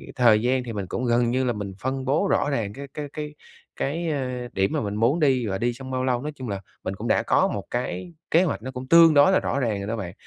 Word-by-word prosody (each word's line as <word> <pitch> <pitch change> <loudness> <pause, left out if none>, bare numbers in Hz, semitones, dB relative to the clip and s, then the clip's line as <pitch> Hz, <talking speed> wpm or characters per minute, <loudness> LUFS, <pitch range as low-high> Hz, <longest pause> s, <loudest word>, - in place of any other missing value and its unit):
thời 115 -5 +5
gian 125 +2 +1
thì 120 -2 -6
mình 100 -3 -4
cũng 125 - -3
gần 120 0 +2
như 130 +1 +1
là 120 -2 +1
mình 100 -2 -5
phân 130 +2 -3
bố 145 +9 +2
rõ 145 - +2
ràng 110 -7 -2
cái 140 +3 -8
cái 150 -1 -5
cái 150 -1 -5 0.4
cái, 165 +4 -2
ờ, 125 -4 -3
điểm 95 +1 +1
mà - - 0
mình 105 -1 -3
muốn 120 +9 +2
đi 130 -6 +2
và 95 -1 -1
đi 120 +4 0
trong 130 +2 -9
bao 130 0 -1
lâu, 125 -1 0
nói 150 +1 -4
chung 130 -5 -6
là 100 -1 -3 0.2
mình 95 - -3
cũng - - -5
đã - - +2
có - - +3
một 100 - -4
cái 130 +8 -3 0.2
kế 170 +3 +5
hoạch 150 -10 -2
nó 130 +2 -6
cũng 130 0 -7
tương 165 0 +7
đối 145 +6 +6
là - - +4
rõ 140 - -1
ràng 110 -6 0
rồi 100 - -5
đó 115 - -2
bạn. 95 -6 -5
125 Hz, 285 wpm, -24 LUFS, 110-140 Hz, 0.4 s, tương